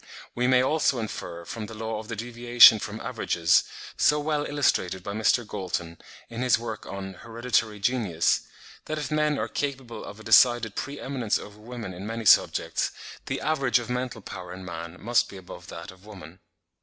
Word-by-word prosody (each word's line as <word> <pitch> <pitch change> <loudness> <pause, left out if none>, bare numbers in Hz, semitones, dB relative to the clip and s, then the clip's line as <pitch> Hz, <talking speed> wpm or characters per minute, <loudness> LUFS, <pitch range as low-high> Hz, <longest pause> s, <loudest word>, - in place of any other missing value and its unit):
We 125 +1 0
may 130 0 +5
also 145 -1 +2
infer, 85 -6 -5
from 110 +4 -6
the 115 - -9
law 110 0 -4
of 110 - -9
the 115 - -4
deviation 120 0 +6
from 110 +1 -6
averages, 85 -9 +2 0.3
so 150 +1 +4
well 150 0 0
illustrated 95 -11 0
by 100 - -5
Mr. 110 +3 +2
Galton, 90 -5 -4 0.3
in 115 +1 -6
his 125 -1 +4
work 115 -2 -6
on 95 -1 -6
'Hereditary 115 0 -1
Genius,' 100 -7 +1 0.4
that 155 - -3
if 150 0 -4
men 150 -1 +1
are - - -1
capable 130 -6 -4
of 105 - -9
a - - -12
decided 115 0 +5
pre 140 +5 -5
eminence 125 -6 -1
over 105 0 -11
women 115 -3 -7
in 95 +4 -7
many 115 0 -4
subjects, - - +4 0.4
the - - -3
average 135 -6 +2
of 120 0 -4
mental 125 -2 -3
power 90 -2 -8
in 95 +1 -8
man 85 0 -7
must 120 +4 +2
be 100 - -10
above 90 -1 -11
that 85 -2 -8
of 95 0 -19
woman. 95 -5 -12
110 Hz, 185 wpm, -26 LUFS, 95-125 Hz, 0.4 s, deviation